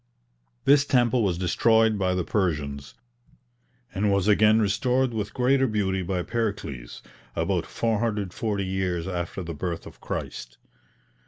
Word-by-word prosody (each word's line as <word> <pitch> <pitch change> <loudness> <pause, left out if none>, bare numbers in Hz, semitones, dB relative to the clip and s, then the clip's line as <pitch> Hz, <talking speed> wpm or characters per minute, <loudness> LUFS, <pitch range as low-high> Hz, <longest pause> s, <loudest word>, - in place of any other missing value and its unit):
This 140 0 +6
temple 125 -3 +2
was 90 -4 0
destroyed 110 +4 +3
by 90 -1 +1
the 90 - 0
Persians, 75 -8 -2 1.0
and 100 +1 +1
was 100 0 +1
again 110 +1 +5
restored 125 +5 +1
with 105 -2 -3
greater 135 +1 +2
beauty 95 -4 0
by 90 0 -2
Pericles, 85 - -4 0.3
about - - -1
440 105 -2 -1
years 95 -2 -2
after 90 0 -4
the 85 -1 -5
birth 85 +1 -4
of - - -13
Christ. - - -6
100 Hz, 130 wpm, -25 LUFS, 90-110 Hz, 1.0 s, This